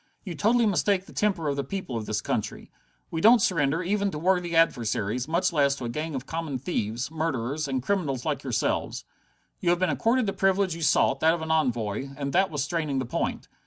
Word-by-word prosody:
"You 185 - -5
totally 225 +8 +2
mistake 200 -1 +1
the - - -14
temper 195 -7 0
of 140 - 0
the 140 - -2
people 160 -3 -5
of 110 -2 -4
this 110 -1 -1
country. - - -3 0.4
We 160 - -2
don't 230 +5 +7
surrender, 165 -4 +1
even 200 +2 0
to 155 - -5
worthy 175 +1 +1
adversaries, 120 -6 +1
much 175 +3 +1
less 140 -3 +3
to 130 - -6
a - - -3
gang 155 +5 -4
of 130 0 -4
common 160 -3 -3
thieves, 120 - -3
murderers, 150 -2 -2
and 130 -2 -2
criminals 145 -9 -1
like 150 -2 -1
yourselves. 125 -6 -1 0.5
You 175 - 0
have 175 - +4
been 180 -2 +1
accorded 230 - +1
the 195 - -1
privilege 195 -1 +2
you 165 - -7
sought, 150 -2 +3
that 160 +1 +4
of 165 - -5
an 160 - -3
envoy, 120 -6 0
and 140 -1 -3
that 190 +1 +3
was 145 -3 -2
straining 150 -2 -2
the 130 - -1
point. 120 - -3
160 Hz, 215 wpm, -26 LUFS, 135-185 Hz, 0.5 s, don't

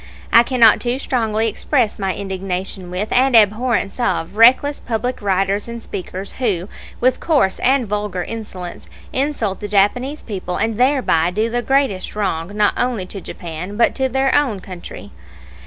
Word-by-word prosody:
I 230 - +9
cannot 235 -3 +4
too 245 +1 -1
strongly 225 -5 0
express 230 0 0
my 195 -1 -1
indignation 190 -1 -4
with, 185 +4 -3
and 260 0 +3
abhorrence 220 0 +2
of, 200 -7 -1
reckless 260 +6 +5
public 245 +1 -3
writers 195 +1 0
and 235 0 -6
speakers 190 +1 -6
who, 195 -8 0 0.3
with 255 +1 +2
coarse 280 - +1
and 260 -2 +2
vulgar 205 -3 -2
insolence, 190 -6 -7 0.2
insult 260 -8 -1
the 205 - -5
Japanese 245 +9 +1
people 185 -4 -4
and 225 +1 -1
thereby 250 - +3
do 215 +5 -1
the 240 +1 0
greatest 265 -9 0
wrong 195 -2 -2
not 210 -1 +3
only 245 -6 -1
to 195 +1 -8
Japan 175 +4 -7
but 235 - +3
to 265 -1 -1
their 265 +1 +1
own 265 -9 +2
country. 185 -2 -10
215 Hz, 155 wpm, -19 LUFS, 190-250 Hz, 0.3 s, I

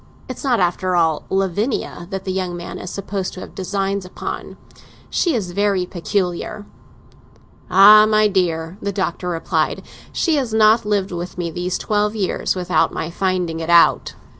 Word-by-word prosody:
It's 255 - -7
not, 255 -4 +2
after 180 0 0
all, 160 -3 +1
Lavinia 195 -1 -1
that 195 -1 -5
the 190 - -2
young 185 -2 -3
man 175 - -7
is 180 - -7
supposed 195 -1 -4
to - - -8
have - - -10
designs 195 +1 -2
upon. 180 - -7 0.5
She 340 -6 +1
is 190 -6 -2
very 200 -1 +1
peculiar." 180 +3 -3 1.0
"Ah, 210 +3 +8
my 215 0 +4
dear," 175 -2 -1
the 200 - -2
Doctor 185 -2 -2
replied, 165 -2 -1 0.3
"she 325 -3 +1
has 245 -6 -1
not 220 0 +5
lived 200 -2 0
with 175 +1 -6
me 170 -2 -3
these 180 +2 -2
twelve 210 0 0
years 195 -2 -1
without 180 -1 +1
my 160 - -4
finding 180 -3 -1
it 165 0 -5
out!" 170 0 +4
190 Hz, 165 wpm, -20 LUFS, 175-205 Hz, 1.0 s, Ah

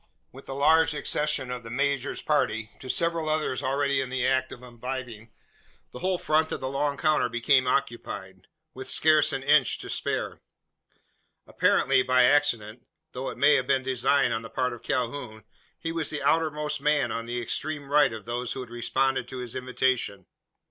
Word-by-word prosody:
With 135 - -14
the 135 - -5
large 155 +2 +4
accession 150 -3 -1
of 125 -1 -4
the 115 - -10
major's 140 +2 -1
party, 110 -7 0
to 130 - -10
several 165 +2 0
others 155 -4 -1
already 140 0 +1
in 130 - -4
the 130 -1 -1
act 130 0 +1
of 125 - -10
imbibing, 120 -2 -7 0.6
the 125 - -9
whole 185 +3 0
front 155 -1 +1
of - - -3
the 130 - -4
long 140 +1 -1
counter 155 -3 +2
became 130 +2 +3
occupied 100 -8 -3 0.3
with 130 0 -7
scarce 155 -1 +4
an 135 - -3
inch 145 -1 +4
to - - -6
spare. - - -2 1.0
Apparently - - +3
by 130 0 +4
accident 125 -5 +1 0.2
though 130 +1 -4
it - - -8
may 145 +1 +5
have 130 -3 +1
been 135 -1 +2
design 130 +2 +2
on 115 - -1
the 115 - -9
part 125 -1 -1
of 120 - -10
Calhoun 120 -3 -3 0.3
he 165 - -4
was 165 -2 -2
the 150 -2 -4
outermost 150 -2 0
man 150 0 +2
on 115 0 -4
the 120 +1 -2
extreme 145 +5 -3
right 150 -2 +5
of 110 -2 -8
those 120 +1 -3
who 130 - -5
had 125 -2 -10
responded 130 +2 0
to 130 - -7
his 125 -2 -6
invitation. 125 -6 -1
130 Hz, 185 wpm, -27 LUFS, 120-145 Hz, 1.0 s, may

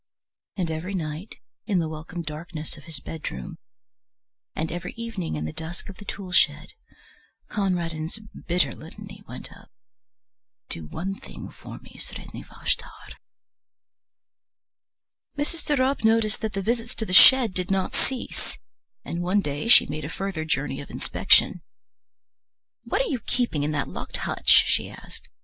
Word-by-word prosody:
And 175 -4 0
every 170 +5 -3
night, 160 +3 -4 0.3
in 200 -4 +2
the 165 -2 +2
welcome 160 +2 -5
darkness 155 0 -6
of - - -13
his 160 -5 -4
bedroom, 165 +4 -6 1.0
and 160 0 -1
every 175 0 -4
evening 225 - -3
in 75 0 -2
the 80 - -4
dusk 170 +5 -6
of 195 - -9
the 205 - -11
tool 195 -3 -5
shed, - - +3 0.8
Conradin's 170 -4 -1 0.3
bitter 175 +1 +3
litany - - -10
went - - -7
up: - - -17 1.0
"Do 80 -2 +1
one 195 - -4
thing - - -9
for - - -9
me, - - -14
Sredni - - -7
Vashtar." - - -4 2.2
Mrs. 300 +3 -2
de 295 - +2
Ropp 260 0 +2
noticed 220 -1 +3
that 220 -1 -2
the 195 0 -1
visits 235 +2 -1
to 220 - -2
the 185 - -3
shed 245 0 +9
did 180 +1 -2
not 195 -1 +1
cease, 260 -2 -4 0.5
and 170 - -2
one 185 +3 +3
day 145 +2 -2
she 235 - +9
made 150 +1 -4
a 150 - -3
further 185 -3 -3
journey 135 -3 0
of 140 - -10
inspection. 185 -2 +4 1.2
"What 365 - +2
are - - -2
you 260 - 0
keeping 240 - +1
in 145 - +1
that 140 -2 0
locked - - -4
hutch?" - - -1 0.2
she - - +1
asked. - - -12
180 Hz, 155 wpm, -26 LUFS, 155-215 Hz, 2.2 s, shed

